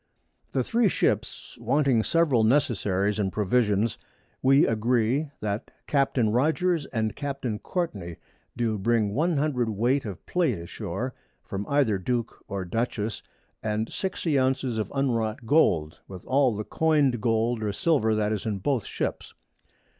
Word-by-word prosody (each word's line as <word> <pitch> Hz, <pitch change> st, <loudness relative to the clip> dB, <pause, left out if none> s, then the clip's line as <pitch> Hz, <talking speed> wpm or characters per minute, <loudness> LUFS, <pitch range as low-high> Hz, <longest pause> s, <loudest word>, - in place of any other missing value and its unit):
The -, -, +1 dB
Three 235 Hz, -2 st, +2 dB
Ships -, -, -1 dB
wanting 140 Hz, -5 st, +2 dB
several 145 Hz, -4 st, +2 dB
Necessaries 105 Hz, -5 st, +1 dB
and 95 Hz, -2 st, 0 dB
Provisions, 105 Hz, +1 st, +1 dB, 0.4 s
we 135 Hz, +3 st, +5 dB
agree, 120 Hz, +5 st, +1 dB
that 105 Hz, 0 st, -3 dB, 0.2 s
Captain 135 Hz, -6 st, +2 dB
Rogers 160 Hz, -, +1 dB
and 110 Hz, -3 st, -2 dB
Captain 135 Hz, -6 st, -3 dB
Courtney 100 Hz, -, -3 dB, 0.4 s
do 115 Hz, -3 st, 0 dB
bring 110 Hz, -1 st, +1 dB
100 145 Hz, -4 st, +1 dB
Weight 120 Hz, +6 st, +1 dB
of 100 Hz, -5 st, -7 dB
Plate 165 Hz, -, +1 dB
a 85 Hz, -, -8 dB
shoar -, -, -4 dB, 0.3 s
from 100 Hz, +1 st, -5 dB
either 135 Hz, -9 st, +2 dB
Duke 120 Hz, +4 st, -2 dB
or 100 Hz, -2 st, -4 dB
Dutchess 110 Hz, +2 st, -2 dB
_, -, -, -37 dB, 0.4 s
and 110 Hz, +1 st, -2 dB
60 165 Hz, -6 st, -1 dB
Ounces 130 Hz, -3 st, 0 dB
of 105 Hz, -1 st, -3 dB
unwrought 115 Hz, -4 st, 0 dB
Gold, 85 Hz, -, +2 dB
with 95 Hz, -2 st, -10 dB
all 130 Hz, -3 st, +3 dB
the 105 Hz, -, -3 dB
coined 145 Hz, -5 st, +2 dB
Gold 115 Hz, 0 st, +1 dB
or 105 Hz, -1 st, -1 dB
Silver 110 Hz, -2 st, +2 dB
that 105 Hz, 0 st, 0 dB
is 110 Hz, +1 st, -3 dB
in 105 Hz, -2 st, -1 dB
both 120 Hz, +2 st, -1 dB
Ships. -, -, -4 dB
115 Hz, 145 wpm, -26 LUFS, 105-140 Hz, 0.4 s, we